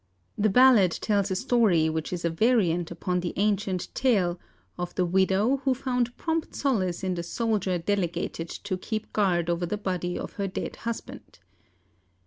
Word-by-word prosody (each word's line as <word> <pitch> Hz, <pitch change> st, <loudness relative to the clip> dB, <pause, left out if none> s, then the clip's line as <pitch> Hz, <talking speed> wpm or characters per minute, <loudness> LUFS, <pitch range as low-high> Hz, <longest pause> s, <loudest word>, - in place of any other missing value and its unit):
The 215 Hz, +1 st, +2 dB
ballad 220 Hz, -5 st, +6 dB
tells 200 Hz, -2 st, 0 dB
a 190 Hz, -, -1 dB
story 210 Hz, -8 st, +3 dB
which 160 Hz, -1 st, -2 dB
is 175 Hz, -2 st, -3 dB
a 170 Hz, -, +1 dB
variant 175 Hz, -4 st, +2 dB
upon 180 Hz, +1 st, -2 dB
the 175 Hz, -1 st, -3 dB
ancient 200 Hz, -2 st, -1 dB
tale 190 Hz, -9 st, +1 dB, 0.4 s
of 175 Hz, 0 st, -5 dB
the 180 Hz, -, +1 dB
widow 190 Hz, +7 st, +2 dB
who 265 Hz, -1 st, 0 dB
found 250 Hz, -2 st, -1 dB
prompt 325 Hz, -1 st, -2 dB
solace 190 Hz, -11 st, 0 dB
in 185 Hz, -1 st, 0 dB
the 175 Hz, -, -3 dB
soldier 200 Hz, 0 st, -1 dB
delegated 175 Hz, -2 st, -2 dB
to 200 Hz, -2 st, -4 dB
keep 220 Hz, +2 st, -5 dB
guard 180 Hz, -5 st, +2 dB
over 175 Hz, 0 st, -1 dB
the 210 Hz, -, -2 dB
body 180 Hz, -3 st, -2 dB
of -, -, -6 dB
her 195 Hz, -, 0 dB
dead 190 Hz, -, -5 dB
husband. 230 Hz, -1 st, -7 dB
190 Hz, 165 wpm, -27 LUFS, 175-225 Hz, 0.4 s, ballad